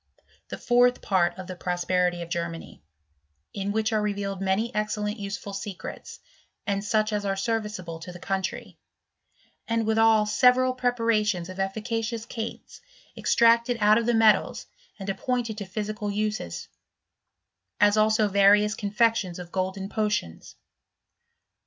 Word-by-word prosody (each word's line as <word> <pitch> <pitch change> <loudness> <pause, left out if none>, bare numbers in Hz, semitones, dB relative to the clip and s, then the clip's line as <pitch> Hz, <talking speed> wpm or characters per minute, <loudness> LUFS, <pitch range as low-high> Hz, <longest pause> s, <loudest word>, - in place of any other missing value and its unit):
The - - -5
fourth 245 +1 +3
part 175 -3 +1
of 185 - -7
the 185 0 -7
Prosperity 180 0 0
of 170 - -11
Gennany; 170 - -5 0.7
in 200 0 -3
which 220 +1 0
are 215 - +2
revealed 200 -2 -3
many 195 +5 0
excellent, 210 0 -2
useful 200 0 -5
secrets, 195 -1 -7 0.5
and 200 -1 -1
such 215 +1 +1
as 205 -1 -1
are 195 -1 -1
serviceable 210 -5 -3
to 165 +2 -8
the 175 - -10
country; 190 +1 -4 0.9
and 230 -1 0
withal 220 -1 +4
several 250 +4 +4
preparations 230 -7 0
of 185 +1 -8
efficacious 220 +3 -2
cates 225 -1 -7 0.3
extracted 235 +1 +3
out 210 +1 +5
of 230 - -3
tiie 240 -1 +3
metals 215 -3 +3 0.3
and 195 - -8
appointed 230 +1 -2
to 200 - -5
physical 210 +2 -4
uses; 210 - -3 1.1
as 205 0 +5
also 215 0 +3
various 205 +1 +4
confections 215 -3 0
of 175 -1 -9
golden 190 +1 -2
potions. 210 - -3
210 Hz, 135 wpm, -26 LUFS, 195-225 Hz, 1.1 s, out